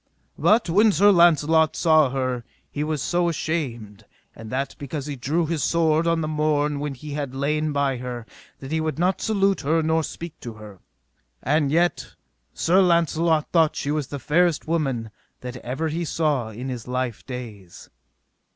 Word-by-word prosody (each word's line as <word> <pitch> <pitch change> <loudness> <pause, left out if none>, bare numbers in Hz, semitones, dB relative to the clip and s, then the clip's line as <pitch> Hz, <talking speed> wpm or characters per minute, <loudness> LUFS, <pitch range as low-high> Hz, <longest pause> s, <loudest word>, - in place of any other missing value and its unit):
But 225 0 +3
when 210 +6 +4
Sir 205 +4 +5
Launcelot 160 -3 +4
saw 155 -4 +4
her 130 -2 -2 0.3
he 145 - -2
was 150 -3 -2
so 175 0 +1
ashamed, 120 -11 -4 0.3
and 110 - -10
that 135 +2 -3
because 140 0 -5
he 145 -1 -4
drew 150 +7 -1
his 160 -1 -2
sword 165 -1 +2
on 165 -1 +2
the 155 - -2
morn 150 -1 0
when 145 -1 -4
he 150 +4 -9
had 140 -2 -4
lain 150 +3 0
by 140 -2 0
her, 120 -2 -6 0.3
that 135 +1 -9
he 160 0 0
would 155 -1 -2
not 180 +3 +1
salute 195 -3 +1
her 160 +3 +1
nor 160 +1 +1
speak 165 +2 -8
to 120 - -7
her; 105 -3 -12 0.6
and 145 0 +2
yet 175 +3 0 0.4
Sir 185 +3 +3
Launcelot 165 -3 +2
thought 160 -3 +3
she 145 - -2
was 150 -3 -1
the 145 - -5
fairest 165 +4 +1
woman 135 -9 -1 0.3
that 125 0 -6
ever 130 +7 -3
he 165 +2 -2
saw 150 -8 0
in 120 +4 -7
his 125 -3 -6
life 125 -2 -3
days. 110 -8 -9
150 Hz, 175 wpm, -23 LUFS, 130-165 Hz, 0.6 s, Sir